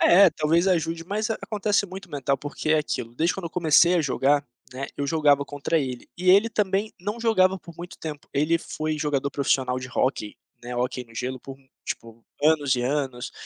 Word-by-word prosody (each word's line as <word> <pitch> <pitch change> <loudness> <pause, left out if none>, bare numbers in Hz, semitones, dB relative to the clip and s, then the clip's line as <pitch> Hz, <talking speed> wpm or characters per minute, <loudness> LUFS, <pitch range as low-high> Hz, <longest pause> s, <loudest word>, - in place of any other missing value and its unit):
É 190 +2 +7
talvez 165 +4 +2
ajude, 165 -1 0
mas 215 +4 -2
acontece 210 -2 0
muito 190 -1 -10
mental 140 -1 0
porque 145 +2 -4
é 155 - +5
aquilo, 120 -5 -3
desde 165 +6 +1
quando 195 - -6
eu - - -8
comecei 175 0 +4
a 175 - +3
jogar, 140 +1 +1 0.3
né, 135 +2 -4
eu 140 - -2
jogava 145 -2 +3
contra 145 +3 -1
ele, 130 -4 -4
e 180 0 -1
ele 200 +5 +6
também 205 0 0
não 205 +5 -4
jogava 190 -5 +3
por 170 -2 -13
muito 175 +1 -9
tempo, 150 -2 -7
ele 155 +4 +2
foi 155 -2 -4
jogador 140 -2 -1
profissional 130 -2 0
de 130 - -7
hóquei, 120 -4 -1 0.3
né, 120 0 -6
hóquei 125 +1 -1
no 115 0 -19
gelo 130 +2 -4
por 135 -1 -9 0.3
tipo 115 0 -6 0.2
anos 150 -4 +3
e 120 - -1
anos, 130 -2 -2
150 Hz, 195 wpm, -25 LUFS, 135-180 Hz, 0.3 s, É